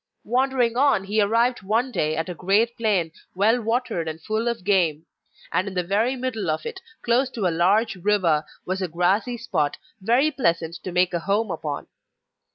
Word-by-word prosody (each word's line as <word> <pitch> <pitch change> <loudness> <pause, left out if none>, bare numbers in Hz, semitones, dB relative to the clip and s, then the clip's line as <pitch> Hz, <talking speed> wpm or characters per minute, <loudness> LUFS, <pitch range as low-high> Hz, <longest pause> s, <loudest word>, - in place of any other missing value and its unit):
Wandering 250 -1 +1
on 270 -7 +3
he 210 +2 +1
arrived 230 +4 +2
one 225 +7 0
day 155 -7 0
at 160 +2 -2
a 180 - -4
great 205 +7 +1
plain, 200 -8 0 0.2
well 220 +6 +3
watered 225 -7 -1
and 160 0 -5
full 220 +7 -2
of 235 -5 -2
game; 170 -6 +1 0.5
and 185 - 0
in 195 - -6
the 180 - +1
very 215 +8 +1
middle 240 -8 -3
of 155 0 -2
it, 380 - -6 0.2
close 245 +3 +2
to 225 -6 -3
a 175 - +2
large 200 +6 +2
river, 180 -5 +2 0.2
was 190 +1 -2
a 185 - 0
grassy 190 +9 0
spot, 155 -9 -1 0.2
very 245 +9 +3
pleasant 170 - 0
to 185 - -7
make 180 +1 +2
a 170 - 0
home 200 +4 0
upon. 150 -3 -4
200 Hz, 185 wpm, -24 LUFS, 175-235 Hz, 0.5 s, on